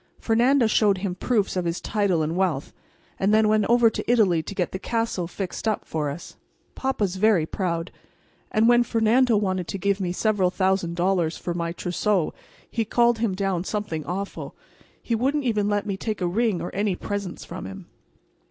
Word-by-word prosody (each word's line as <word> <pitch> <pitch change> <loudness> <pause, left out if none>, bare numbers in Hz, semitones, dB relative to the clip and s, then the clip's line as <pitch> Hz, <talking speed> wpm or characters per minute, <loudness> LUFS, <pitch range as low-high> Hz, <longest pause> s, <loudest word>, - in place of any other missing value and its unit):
Fernando 240 +3 +3
showed 210 -2 +3
him 185 -1 -2
proofs 205 +1 0
of 180 -1 -1
his 170 0 -1
title 195 -7 0
and 160 +2 -2
wealth, 180 -7 -1 0.5
and 195 +2 +2
then 215 0 +4
went 215 -1 +3
over 240 0 +5
to 225 - -1
Italy 195 -9 +3
to 200 - -8
get 180 -2 -1
the 190 - -4
castle 225 -6 -1
fixed 190 +4 -5
up 215 - 0
for 150 -2 -2
us. 145 +5 -8 0.4
Papa's 210 -9 -1
very 200 -5 +3
proud, 170 -1 -3 0.6
and 220 +1 +3
when 240 0 +6
Fernando 235 +1 +3
wanted 185 -3 -1
to - - -3
give 200 +1 0
me 180 -2 -1
several 195 -1 +1
thousand 185 -2 0
dollars 175 -2 +1
for 175 - -4
my 170 -1 -2
trousseau 180 +1 0 0.3
he 230 - -1
called 235 +1 +2
him 220 -5 0
down 190 -3 -1
something 190 -6 -3
awful. 195 +3 -5 0.4
He 235 - -3
wouldn't 275 +6 +1
even 210 -4 +1
let 205 -1 0
me 195 -2 -3
take 215 +1 -3
a 180 - 0
ring 205 +1 0
or 175 - -5
any 200 -1 0
presents 200 -2 -5
from - - -7
him. 95 - -9
200 Hz, 190 wpm, -24 LUFS, 180-220 Hz, 0.6 s, when